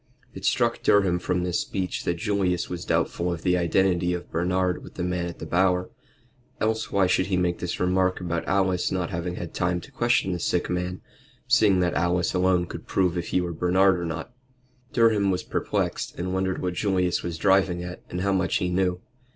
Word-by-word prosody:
It -, -, -7 dB
struck -, -, +1 dB
Durham 95 Hz, -3 st, +3 dB
from 90 Hz, 0 st, -1 dB
this 90 Hz, -1 st, 0 dB
speech 95 Hz, -2 st, -3 dB
that 85 Hz, -, +1 dB
Julius 95 Hz, -2 st, -1 dB
was 90 Hz, -1 st, -5 dB
doubtful 90 Hz, +1 st, 0 dB
of 85 Hz, -1 st, -5 dB
the 90 Hz, -1 st, +3 dB
identity 90 Hz, 0 st, +2 dB
of 90 Hz, -, -8 dB
Bernard 90 Hz, +2 st, 0 dB
with -, -, -12 dB
the 90 Hz, -, -3 dB
man 90 Hz, -1 st, -1 dB
at 85 Hz, -, -7 dB
the -, -, -7 dB
Bower. 90 Hz, 0 st, +1 dB, 0.7 s
Else 110 Hz, +1 st, -1 dB
why 100 Hz, -1 st, +3 dB
should 95 Hz, 0 st, +2 dB
he 95 Hz, -2 st, 0 dB
make 90 Hz, -1 st, 0 dB
this 90 Hz, -, -3 dB
remark 95 Hz, 0 st, +1 dB
about 85 Hz, -2 st, -2 dB
Alice 95 Hz, -2 st, +1 dB
not 90 Hz, -2 st, -2 dB
having 90 Hz, 0 st, -3 dB
had 85 Hz, -2 st, -6 dB
time 90 Hz, 0 st, 0 dB
to 140 Hz, -, -14 dB
question 120 Hz, -6 st, +1 dB
the 90 Hz, -, -2 dB
sick 90 Hz, +1 st, 0 dB
man, 90 Hz, 0 st, -3 dB, 0.5 s
seeing 100 Hz, -4 st, +4 dB
that 90 Hz, -1 st, +1 dB
Alice 85 Hz, 0 st, +1 dB
alone 90 Hz, -1 st, +2 dB
could -, -, -9 dB
prove 90 Hz, -2 st, +1 dB
if 85 Hz, -1 st, -3 dB
he 90 Hz, -, +1 dB
were 85 Hz, -1 st, -3 dB
Bernard 90 Hz, +3 st, +3 dB
or 85 Hz, -, -3 dB
not? 80 Hz, +8 st, -5 dB, 0.6 s
Durham 110 Hz, -4 st, +3 dB
was 90 Hz, -1 st, 0 dB
perplexed, -, -, -2 dB
and 90 Hz, +1 st, -3 dB
wondered 95 Hz, 0 st, -1 dB
what 90 Hz, -1 st, -1 dB
Julius 90 Hz, -2 st, 0 dB
was 85 Hz, -1 st, -4 dB
driving 95 Hz, -1 st, +2 dB
at, 90 Hz, 0 st, -7 dB
and 90 Hz, -, -3 dB
how 100 Hz, +1 st, +1 dB
much 95 Hz, -2 st, +1 dB
he 90 Hz, -, 0 dB
knew. 90 Hz, 0 st, 0 dB
90 Hz, 205 wpm, -25 LUFS, 90-95 Hz, 0.7 s, seeing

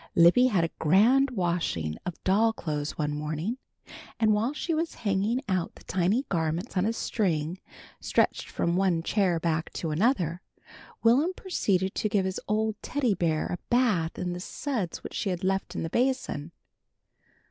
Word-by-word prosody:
Libby 175 Hz, +10 st, +6 dB
had 195 Hz, -9 st, +2 dB
a 165 Hz, -, -1 dB
grand 230 Hz, -, +4 dB
washing 170 Hz, -, -1 dB
of 180 Hz, -, -5 dB
doll 220 Hz, +4 st, +3 dB
clothes 150 Hz, -7 st, -4 dB
one 150 Hz, -1 st, -1 dB
morning, 155 Hz, -, -3 dB, 0.6 s
and 220 Hz, -2 st, +4 dB
while 220 Hz, +5 st, +1 dB
she 325 Hz, +3 st, -3 dB
was 325 Hz, +1 st, -1 dB
hanging 205 Hz, +5 st, +1 dB
out 185 Hz, -3 st, -1 dB
the -, -, -15 dB
tiny 190 Hz, +9 st, +1 dB
garments 165 Hz, +1 st, -2 dB
on 185 Hz, +2 st, +2 dB
a -, -, +2 dB
string, 175 Hz, -7 st, -1 dB, 0.4 s
stretched -, -, 0 dB
from 170 Hz, 0 st, 0 dB
one 180 Hz, -3 st, +2 dB
chair 185 Hz, -3 st, +1 dB
back 160 Hz, -1 st, -1 dB
to 160 Hz, -, -3 dB
another, 175 Hz, -, +1 dB, 0.6 s
Will'm 270 Hz, +11 st, +4 dB
proceeded 195 Hz, -, 0 dB
to 215 Hz, -, -1 dB
give 200 Hz, -2 st, +1 dB
his 190 Hz, 0 st, -2 dB
old 215 Hz, 0 st, 0 dB
Teddy 255 Hz, -6 st, 0 dB
Bear 160 Hz, -4 st, 0 dB
a 175 Hz, -, -4 dB
bath 220 Hz, -10 st, +2 dB
in 180 Hz, -1 st, -2 dB
the 175 Hz, -, -5 dB
suds 210 Hz, -, -4 dB
which -, -, -7 dB
she 200 Hz, -, -1 dB
had 180 Hz, -1 st, -3 dB
left 190 Hz, -1 st, -1 dB
in -, -, -2 dB
the 165 Hz, -, -3 dB
basin. 245 Hz, -, -1 dB
190 Hz, 170 wpm, -27 LUFS, 165-225 Hz, 0.6 s, Libby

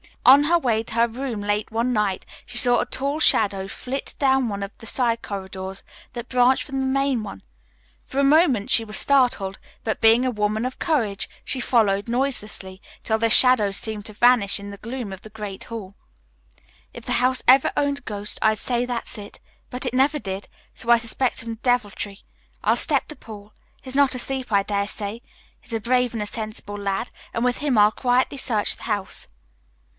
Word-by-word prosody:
On 275 Hz, +3 st, +8 dB
her 345 Hz, +3 st, +4 dB
way 230 Hz, -8 st, 0 dB
to 230 Hz, -, -9 dB
her 235 Hz, 0 st, +4 dB
room 235 Hz, -2 st, -4 dB
late 205 Hz, +1 st, -1 dB
one 235 Hz, +3 st, 0 dB
night, 210 Hz, -4 st, 0 dB, 0.2 s
she 245 Hz, -, -8 dB
saw 245 Hz, 0 st, +4 dB
a -, -, 0 dB
tall 280 Hz, +3 st, -2 dB
shadow 195 Hz, -9 st, +3 dB
flit 260 Hz, +7 st, -6 dB
down 265 Hz, -3 st, +2 dB
one 200 Hz, -1 st, -4 dB
of 200 Hz, -, -6 dB
the -, -, -13 dB
side 230 Hz, 0 st, +1 dB
corridors 190 Hz, -1 st, -6 dB, 0.3 s
that 240 Hz, -1 st, -7 dB
branched 250 Hz, +1 st, +3 dB
from 270 Hz, -2 st, -4 dB
the 265 Hz, -, 0 dB
main 270 Hz, -2 st, +1 dB
one. 200 Hz, -, -8 dB, 0.6 s
For 265 Hz, -, -8 dB
a 280 Hz, -, +4 dB
moment 275 Hz, -, +4 dB
she 225 Hz, -, +4 dB
was 215 Hz, 0 st, -5 dB
startled, 245 Hz, -8 st, +1 dB, 0.2 s
but, 220 Hz, -, -2 dB
being 225 Hz, +2 st, +6 dB
a 255 Hz, -, +1 dB
woman 215 Hz, +1 st, -1 dB
of 255 Hz, -, -5 dB
courage, 230 Hz, -, 0 dB
she 260 Hz, -, -2 dB
followed 210 Hz, -5 st, +2 dB
noiselessly, 215 Hz, -7 st, -3 dB, 0.2 s
till 220 Hz, -, +1 dB
the 230 Hz, +1 st, +1 dB
shadow 235 Hz, -4 st, +6 dB
seemed 210 Hz, +1 st, -4 dB
to 215 Hz, -, -9 dB
vanish 220 Hz, -3 st, +3 dB
in 200 Hz, 0 st, -8 dB
the 200 Hz, -, -8 dB
gloom 230 Hz, 0 st, -6 dB
of 190 Hz, 0 st, -8 dB
the 215 Hz, -, -12 dB
great 205 Hz, -3 st, -7 dB
hall. 205 Hz, -4 st, -8 dB, 1.0 s
"If -, -, -10 dB
the -, -, -1 dB
house 255 Hz, +1 st, +2 dB
ever 265 Hz, +1 st, +6 dB
owned 285 Hz, -1 st, 0 dB
a -, -, -27 dB
ghost 205 Hz, -1 st, -3 dB
I'd 220 Hz, 0 st, +3 dB
say 245 Hz, -1 st, 0 dB
that's 240 Hz, -2 st, -3 dB
it, 205 Hz, -1 st, -10 dB, 0.3 s
but 250 Hz, +2 st, -3 dB
it 250 Hz, -, -2 dB
never 275 Hz, +4 st, +3 dB
did, 195 Hz, -6 st, -6 dB, 0.3 s
so 235 Hz, -, -8 dB
I 235 Hz, -, +8 dB
suspect 235 Hz, +2 st, -1 dB
some 230 Hz, 0 st, -4 dB
deviltry. 210 Hz, -5 st, -1 dB, 0.4 s
I'll -, -, +3 dB
step -, -, +1 dB
to 305 Hz, -, -7 dB
Paul. 210 Hz, -4 st, -12 dB, 0.3 s
He's 260 Hz, 0 st, -8 dB
not 280 Hz, -2 st, +4 dB
asleep, 260 Hz, 0 st, -3 dB
I 200 Hz, -1 st, +3 dB
dare 200 Hz, 0 st, -1 dB
say. 210 Hz, +2 st, -5 dB, 0.4 s
He's 235 Hz, -, -12 dB
a 225 Hz, -, 0 dB
brave 250 Hz, +2 st, +1 dB
and 220 Hz, -2 st, -2 dB
a -, -, -6 dB
sensible 215 Hz, -1 st, -6 dB
lad, 200 Hz, +3 st, -2 dB, 0.2 s
and 230 Hz, -, -1 dB
with 250 Hz, -1 st, +1 dB
him 285 Hz, -5 st, 0 dB
I'll 210 Hz, 0 st, +6 dB
quietly 255 Hz, +3 st, +1 dB
search 225 Hz, -6 st, 0 dB
the -, -, -13 dB
house." 205 Hz, -3 st, -3 dB
230 Hz, 200 wpm, -23 LUFS, 205-255 Hz, 1.0 s, On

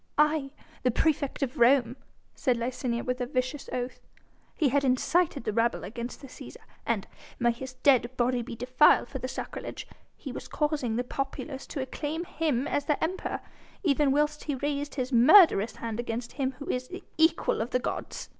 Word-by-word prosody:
"Aye! 300 Hz, -2 st, +3 dB, 0.3 s
the 250 Hz, -, +2 dB
praefect 280 Hz, +2 st, 0 dB
of 270 Hz, +2 st, -3 dB
Rome," 245 Hz, 0 st, +4 dB, 0.4 s
said 250 Hz, -2 st, +1 dB
Licinia, 235 Hz, 0 st, -2 dB
with 250 Hz, 0 st, -2 dB
a 245 Hz, -, -1 dB
vicious 255 Hz, +1 st, -2 dB
oath. 245 Hz, 0 st, -3 dB, 0.6 s
"He 300 Hz, -5 st, +2 dB
had 280 Hz, +2 st, +2 dB
incited 275 Hz, +3 st, +2 dB
the 215 Hz, -, -2 dB
rabble 230 Hz, +2 st, +1 dB
against 235 Hz, +5 st, -6 dB
the 275 Hz, -, -9 dB
Cæsar, -, -, -11 dB, 0.3 s
and -, -, 0 dB, 0.3 s
may 240 Hz, -1 st, +3 dB
his 255 Hz, +2 st, -7 dB
dead 255 Hz, -2 st, +3 dB
body 245 Hz, 0 st, +1 dB
be 235 Hz, 0 st, -7 dB
defiled 255 Hz, +5 st, +4 dB
for 265 Hz, -, -5 dB
the 255 Hz, -, -3 dB
sacrilege! -, -, -6 dB, 0.3 s
he -, -, -7 dB
was -, -, -7 dB
causing 295 Hz, -7 st, -1 dB
the 245 Hz, -, 0 dB
populace 270 Hz, +2 st, -5 dB
to 280 Hz, -, -4 dB
acclaim 305 Hz, +5 st, -4 dB
him 295 Hz, -6 st, -1 dB
as 285 Hz, -, -1 dB
their 295 Hz, -, +1 dB
Emperor, 365 Hz, +4 st, -2 dB, 0.4 s
even 290 Hz, -4 st, +3 dB
whilst 300 Hz, +1 st, +1 dB
he 290 Hz, -, -1 dB
raised 290 Hz, +1 st, -3 dB
his 255 Hz, -1 st, -2 dB
murderous 245 Hz, -, +7 dB
hand 230 Hz, -1 st, -5 dB
against 235 Hz, 0 st, -3 dB
him 270 Hz, -2 st, -2 dB
who 280 Hz, +3 st, -10 dB
is 255 Hz, 0 st, -2 dB
the 365 Hz, +6 st, -8 dB, 0.2 s
equal 320 Hz, -7 st, +3 dB
of 230 Hz, -, -2 dB
the 250 Hz, -, +2 dB
gods!" 250 Hz, -, -4 dB
260 Hz, 185 wpm, -28 LUFS, 245-295 Hz, 0.6 s, murderous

